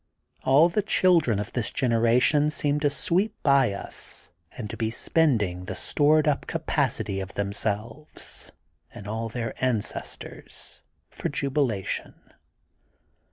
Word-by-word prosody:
All 140 +5 +6
the 195 +5 0
children 180 - +3
of 105 0 -5
this 120 -4 -1
generation 125 +5 +3
seem 150 -1 0
to 145 -1 +2
sweep 185 +9 0
by 140 -5 +4
us 100 - -5 0.2
and 110 - -6
to - - -6
be 110 -2 -1
spending 110 - +1
the - - -5
stored 155 +1 +3
up 145 - 0
capac - - 0
ity 95 - -3
of 95 0 -7
themselves 105 +7 -3 0.4
and 105 - -10
all 115 +2 -3
their 115 0 -4
ancestors 120 -5 -3 0.3
for - - -4
jubilation. 135 -8 -1
125 Hz, 125 wpm, -26 LUFS, 105-150 Hz, 0.4 s, All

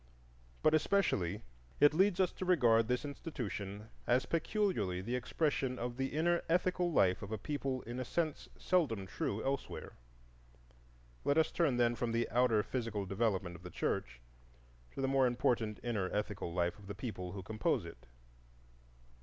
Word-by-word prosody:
But 155 - +5
especially 115 - +1 0.4
it 145 0 +7
leads 190 +2 +3
us 185 -2 +3
to - - -6
regard 120 -11 +4
this 125 +4 0
institution 110 - -5 0.2
as 125 +2 +3
peculiarly 165 - 0
the 115 +7 -2
expression 130 -1 0
of 120 0 -3
the 135 0 0
inner 170 +5 +1
ethical 180 0 +2
life 95 - +3
of 100 - -7
a 110 - -1
people 135 +2 -3
in 120 +2 -5
a - - -1
sense 155 +3 -2
seldom 130 - +1
true 100 +2 -3
elsewhere. 135 0 -3 1.3
Let 140 +2 +2
us 160 - +3
turn, 150 -8 +2
then, 120 -1 +3
from 120 -1 -2
the 115 0 +1
outer 120 -3 +3
physical 115 -6 -3
development 95 -3 0
of 85 - -11
the 90 - -8
church 60 -7 -2 0.7
to - - -3
the 135 - +1
more 135 -1 +4
important 120 -3 0
inner 105 -6 -1
ethical 105 -4 -2
life 85 +2 -1
of 100 - -13
the 100 - -5
people 95 -4 -5
who 95 -2 -6
compose 110 +3 0
it. - - -11
120 Hz, 160 wpm, -34 LUFS, 100-145 Hz, 1.3 s, it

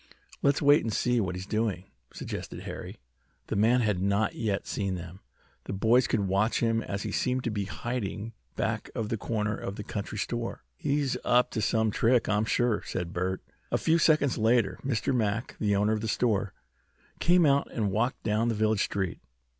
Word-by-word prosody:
"Let's 140 +1 +2
wait 145 +1 +6
and 115 - -2
see 125 +3 +1
what 95 -2 -2
he 90 - -5
is - - -7
doing," 105 -3 -1 0.3
suggested - - -6
Harry. - - -7 0.5
The - - -1
man 115 +5 +4
had 105 -5 +1
not 100 +2 +1
yet 105 -4 -2
seen 100 -3 -2
them. 90 +1 -8 0.5
The - - -4
boys 115 +5 +3
could 110 - +1
watch 100 +4 +1
him 115 -1 +1
as 100 -1 -4
he - - -3
seemed 130 0 0
to 115 - -1
be 100 -2 -2
hiding 110 0 -4 0.2
back - - -2
of 110 -2 -2
the 115 - -1
corner 105 0 -1
of 95 - -5
the 105 - -6
country 105 +1 -5
store. 115 +3 -3
"He's 140 -2 0
up 125 0 +3
to 110 - -2
some 110 +1 +2
trick, 120 +3 +3
I'm 105 +1 +2
sure," 120 -1 +1
said 85 -1 -4
Bert. 95 +1 -2 0.3
A - - +3
few 165 +1 +2
seconds 150 -6 +3
later 110 -4 +2
Mr. 130 -1 0
Mack, 110 0 -1
the 105 -2 +2
owner 105 +2 +2
of 110 - -1
the 110 - -2
store, 105 -3 0 0.6
came 175 0 +5
out 140 -1 +2
and 105 -4 -1
walked 115 +6 0
down 110 +2 +1
the 115 - 0
village 110 -1 +2
street. 95 -3 -3
110 Hz, 195 wpm, -28 LUFS, 100-120 Hz, 0.6 s, wait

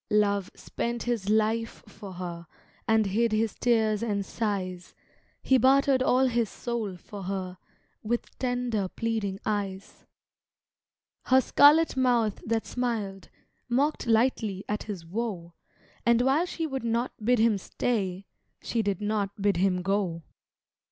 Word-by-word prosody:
Love 200 -2 +2
spent 235 0 -4
his 230 -5 -2
life 220 +1 0
for 200 -2 -10
her 175 -2 -6 0.4
And 220 -1 +3
hid 225 +4 +1
his 215 0 +1
tears 220 -3 +1
and 205 -4 -1
sighs; 185 -6 -3 0.5
He 260 -1 +4
bartered 270 +1 +4
all 260 0 +3
his 235 -4 +1
soul 225 -6 -4
for 200 +3 -10
her, 185 -1 -4 0.4
With 235 +2 -3
tender 245 -5 -1
pleading 215 -2 -2
eyes. 200 -2 -4 1.2
Her 260 +1 +5
scarlet 295 +4 +5
mouth 240 -5 +1
that 225 0 -1
smiled, 215 -7 -3 0.4
Mocked 275 +2 +1
lightly 220 -4 +1
at 210 0 -2
his 195 -6 -6
woe, 180 -3 -4 0.5
And 235 +1 +4
while 285 +7 +2
she 330 -2 -3
would 270 -4 -4
not 235 +2 0
bid 245 +3 +3
him 220 -2 +3
stay 195 -3 -2 0.3
She 230 - -1
did 200 -3 -2
not 205 -1 -2
bid 200 -2 +2
him 180 0 +1
go. 190 -4 -1
215 Hz, 135 wpm, -27 LUFS, 195-240 Hz, 1.2 s, Her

